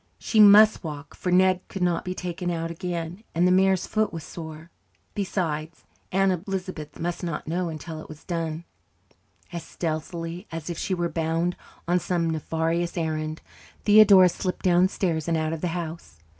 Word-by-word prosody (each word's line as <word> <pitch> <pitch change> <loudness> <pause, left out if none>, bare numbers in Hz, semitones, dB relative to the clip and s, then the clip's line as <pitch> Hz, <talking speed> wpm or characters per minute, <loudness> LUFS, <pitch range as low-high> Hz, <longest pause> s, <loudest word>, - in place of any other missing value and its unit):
She 220 - 0
muse 210 +1 +8
walk, 150 -2 -7
for 180 - -3
Ned 185 0 +4
could 190 - -4
not 175 -2 +1
be 185 0 -4
taken 175 -1 -4
out 165 -1 -2
again, 175 +2 -5
and 175 +2 +4
the - - +4
mare's 190 0 +3
foot 215 0 0
was 165 -2 -6
sore. 160 0 -9 0.4
Besides, 165 -5 -3 0.3
Aunt 190 -1 +1
Elizabeth 185 -5 -5
must 175 +2 -3
not 165 -4 -4
know 175 +2 -1
until 160 0 -7
it - - -12
was 155 -1 -11
done. 165 -1 -3 0.9
As 170 - -3
stealthily 165 +3 -4
as 165 +1 -5
if 170 - -5
she 190 - -1
were 175 -1 0
bound 165 +2 -1 0.3
on 175 +1 +3
some 170 -2 0
nefarious 165 +2 -1
errand, 155 -1 -2 0.4
Theodora 205 -3 +8
slipped 180 +2 -4
downstairs 175 -2 +2
and 165 -1 +1
out 155 0 -1
of 160 - -5
the 180 - 0
house. 165 - -7
170 Hz, 170 wpm, -25 LUFS, 160-185 Hz, 0.9 s, muse